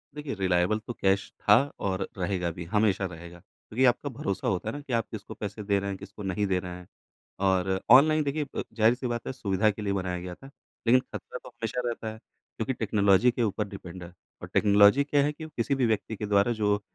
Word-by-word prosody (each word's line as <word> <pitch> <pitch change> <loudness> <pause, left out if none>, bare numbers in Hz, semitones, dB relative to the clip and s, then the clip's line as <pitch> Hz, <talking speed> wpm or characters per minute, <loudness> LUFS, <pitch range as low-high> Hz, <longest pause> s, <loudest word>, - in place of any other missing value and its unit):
देखिए 150 -2 -5
रिलाएबल 95 +2 +1
तो 120 - -3
कैश 95 -2 +1
था 105 - +6 0.3
और 95 0 -1
रहेगा 90 -2 -1
भी 85 +1 -7
हमेशा 105 0 +1
रहेगा। 85 0 -9
क्योंकि 120 +8 -3
आपका 125 +4 +2
भरोसा 100 -6 -3
होता 100 +3 -1
है - - -5
ना, 145 - -6
कि 140 -3 -6
आप 115 -2 +1
किसको 110 -2 -7
पैसे 105 0 -6
दे 100 -1 +1
रहे 100 0 -3
हैं 95 - -4
किसको 100 +1 -10
नहीं 95 +2 -1
दे 95 -1 +1
रहे 90 -1 -7
हैं 90 -1 -13 0.6
और 95 0 +1
ऑनलाइन 155 +4 +7
देखिए 145 +1 -1
अ, - - -1
ज़ाहिर-सी 120 +3 +2
बात 120 -1 -3
है - - -3
सुविधा 100 -4 +1
के 105 - -8
लिए 100 -1 -1
बनाया 90 -2 -2
गया 90 0 -7
था। 135 - -14 0.4
लेकिन 125 +2 +6
ख़तरा - - -8
तो - - -10
हमेशा 115 +2 -4
रहता 115 -2 -3
है - - -11 0.4
क्योंकि 115 +4 -1
टेक्नोलॉज़ी 105 +1 +3
के 120 0 -1
ऊपर 105 -1 -1
डिपेंड 95 -2 -9
है। 85 0 -11 0.3
और - - -7
टेक्नोलॉज़ी 105 +5 +6
क्या 145 0 +2
है 145 - +1
कि 160 +1 -8
वो 155 - -10
किसी 120 +4 +1
भी 130 -2 +1
व्यक्ति 110 0 -1
के 105 - -4
द्वारा 100 +3 +3
जो 105 -2 +1
105 Hz, 230 wpm, -27 LUFS, 95-120 Hz, 0.6 s, ऑनलाइन